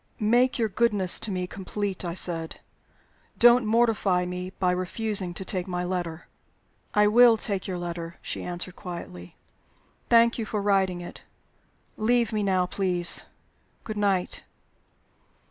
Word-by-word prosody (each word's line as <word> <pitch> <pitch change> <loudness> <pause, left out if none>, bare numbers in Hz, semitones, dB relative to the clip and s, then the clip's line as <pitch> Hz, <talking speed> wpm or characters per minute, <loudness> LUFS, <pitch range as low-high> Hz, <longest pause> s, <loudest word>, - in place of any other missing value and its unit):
"Make 240 +4 +3
your 230 -2 +1
goodness 210 -4 +2
to 225 - -4
me 185 -2 -2
complete," 195 +1 -4
I 170 -1 -4
said. 165 -3 -2 0.8
"Don't 240 -1 +6
mortify 215 -5 +2
me 180 +1 -5
by 185 -1 -1
refusing 185 +1 -1
to 190 - -6
take 185 0 -3
my 180 -1 -3
letter." 175 -2 -4 0.7
"I 210 0 +5
will 230 +2 +6
take 200 -3 -2
your 185 -2 -3
letter," 170 -1 -6
she - - -4
answered, 180 0 -5
quietly. 170 - -9 0.7
"Thank 235 0 +4
you 225 - -2
for 215 - -3
writing 195 -3 +1
it. 175 - -10 0.8
Leave 235 +1 +1
me 215 - 0
now, 190 -2 +1
please. 180 -2 +1 0.6
Good 215 - -6
night." 200 -3 0
190 Hz, 140 wpm, -26 LUFS, 180-215 Hz, 0.8 s, Don't